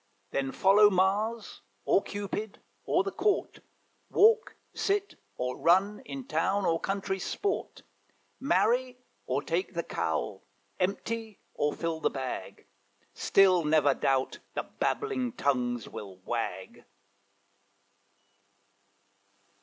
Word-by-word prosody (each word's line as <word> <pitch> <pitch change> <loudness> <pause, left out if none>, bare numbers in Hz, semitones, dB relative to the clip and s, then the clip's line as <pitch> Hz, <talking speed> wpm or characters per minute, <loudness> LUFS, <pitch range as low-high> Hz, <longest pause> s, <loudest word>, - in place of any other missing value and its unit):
Then 135 -1 -1
follow 205 +5 +6
Mars, 205 +4 0 0.2
or - - +4
Cupid, 205 +1 -5 0.3
or 355 - +2
the 395 - -3
Court, 405 +2 0 0.5
Walk, 445 +2 +4 0.2
sit, 405 0 0 0.2
or 125 0 -3
run, 190 +5 +3
in 275 -2 -6
town 200 -7 0
or 165 0 +2
country 195 0 -2
sport, 400 - -3 0.6
Marry 255 -2 +2 0.3
or 135 +3 0
take 175 +2 -2
the 170 - -1
cowl, 80 -7 -2 0.4
empty 220 +3 -2
or 145 0 0
fill 165 -1 -2
the - - +1
bag, 130 -2 -6 0.5
Still 185 -3 +4
never 150 -2 +4
doubt 135 -1 0 0.2
the - - -1
babbling 260 - -2
tongues 125 - 0
will 95 -3 -9
wag. 120 0 -4
190 Hz, 105 wpm, -29 LUFS, 145-230 Hz, 0.6 s, follow